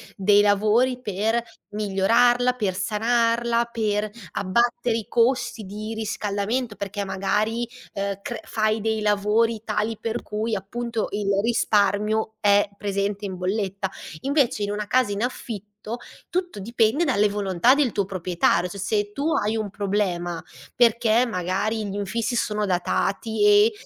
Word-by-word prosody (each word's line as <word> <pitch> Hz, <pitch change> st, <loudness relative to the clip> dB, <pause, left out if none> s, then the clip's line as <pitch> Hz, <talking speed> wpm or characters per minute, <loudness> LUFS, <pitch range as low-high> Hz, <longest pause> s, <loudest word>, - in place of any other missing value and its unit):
dei 205 Hz, +1 st, +4 dB
lavori 215 Hz, +5 st, +3 dB
per 220 Hz, +2 st, 0 dB, 0.3 s
migliorarla, 230 Hz, +5 st, +3 dB
per 205 Hz, -7 st, -2 dB
sanarla, 230 Hz, +3 st, +1 dB
per 215 Hz, -2 st, 0 dB, 0.3 s
abbattere 235 Hz, +3 st, +1 dB
i 220 Hz, -, -5 dB
costi 235 Hz, -2 st, +1 dB
di 215 Hz, +3 st, -6 dB
riscaldamento. 215 Hz, +2 st, -2 dB
Perché 200 Hz, 0 st, -4 dB
magari, 215 Hz, +5 st, -1 dB, 0.3 s
ehm, 200 Hz, 0 st, -3 dB
cr 240 Hz, -, -5 dB
fai 215 Hz, 0 st, 0 dB
dei 220 Hz, 0 st, 0 dB
lavori 210 Hz, +2 st, +1 dB
tali 215 Hz, +1 st, -1 dB
per 230 Hz, +1 st, -3 dB
cui 215 Hz, +2 st, -3 dB
appunto 230 Hz, +3 st, -3 dB
il 205 Hz, 0 st, -3 dB
risparmio 215 Hz, -1 st, +1 dB
è 205 Hz, -1 st, +4 dB
presente 200 Hz, 0 st, -2 dB
in 190 Hz, -2 st, -4 dB
bolletta. 195 Hz, +1 st, -2 dB, 0.3 s
Invece 275 Hz, -6 st, +1 dB
in 205 Hz, -, -1 dB
una 210 Hz, 0 st, -3 dB
casa 250 Hz, -1 st, +2 dB
in 200 Hz, +3 st, -2 dB
affitto 215 Hz, -2 st, -5 dB, 0.3 s
tutto 360 Hz, -, -2 dB
dipende 230 Hz, -, +1 dB
dalle 210 Hz, -7 st, +3 dB
volontà 200 Hz, +4 st, +3 dB
del 280 Hz, -5 st, +2 dB
tuo 200 Hz, -2 st, 0 dB
proprietario. 180 Hz, -1 st, +1 dB
Cioè 200 Hz, -, -8 dB
se 205 Hz, +1 st, -1 dB
tu 295 Hz, +6 st, -1 dB
hai 215 Hz, -3 st, +1 dB
un 215 Hz, -2 st, -2 dB
problema 185 Hz, -5 st, -1 dB, 0.3 s
perché 235 Hz, 0 st, +4 dB
magari 205 Hz, +2 st, -1 dB
gli 195 Hz, -, -5 dB
infissi 220 Hz, +4 st, -2 dB
sono 210 Hz, -2 st, 0 dB
datati 200 Hz, +4 st, 0 dB
e 205 Hz, +2 st, +6 dB
210 Hz, 140 wpm, -24 LUFS, 200-230 Hz, 0.3 s, e